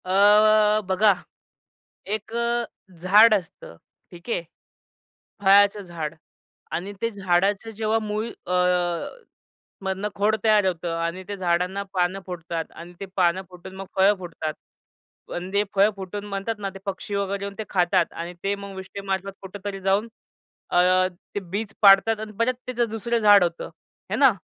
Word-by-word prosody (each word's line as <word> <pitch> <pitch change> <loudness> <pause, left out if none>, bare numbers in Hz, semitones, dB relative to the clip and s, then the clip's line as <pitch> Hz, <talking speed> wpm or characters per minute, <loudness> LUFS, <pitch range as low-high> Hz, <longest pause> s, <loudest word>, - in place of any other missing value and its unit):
अ, 210 +2 +5
बघा. 200 +2 +4 0.9
एक 215 +1 -3
अ, 235 0 +1 0.4
झाड 210 +5 +7
असतं. 175 - -6 0.4
ठीक 175 +5 -12
आहे. 175 - -1 1.0
फळाचं 200 +1 +5
झाड 165 -3 -5 0.6
आणि 190 +4 -4
ते 230 - +1
झाडाचं 195 +2 0
जेव्हा 220 +1 +1
मूळ 215 +1 -3 0.2
अ, 180 - -1 1.3
मधनं 190 +2 -2
खोड 210 +2 +2
तयार 215 -2 +4
होतं 170 -2 -2
आणि 170 +3 -3
ते 205 0 -5
झाडांना 180 +2 0
पानं 180 +1 0
फुटतात 170 -2 -4
आणि 170 +1 -11
ते 195 - -5
पानं 185 0 +2
फुटून 180 +1 -11
मग 195 0 -7
फळं 195 +2 +5
फुटतात. 165 -3 -5 0.7
पण 180 +1 -5
जे 200 +1 +2
फळं 200 +2 +5
फुटून 195 +1 -6
म्हणतात 200 +2 -3
ना 200 -1 -3
ते - - -8
पक्षी 200 +1 -4
वगैरे 200 0 -2
येऊन 200 0 -5
ते 220 - -3
खातात 180 -1 +2
आणि 170 +1 -6
ते 200 +1 +1
मग 200 -1 -9
विष्टेमार्फत 195 0 -4
कुठेतरी 195 +1 -6
जाऊन 195 +4 +1 0.6
अ, - - +1 0.6
ते - - 0
बीज 200 +3 -5
पाडतात 205 +2 +6
आणि 215 0 -6
परत 240 +2 +2
त्याचं 240 -2 -1
दुसरं 230 +2 -1
झाड 205 -3 +7
होतं, 170 -1 -2 0.5
आहे - - -1
ना. 270 -3 +6
195 Hz, 150 wpm, -24 LUFS, 185-210 Hz, 1.3 s, झाड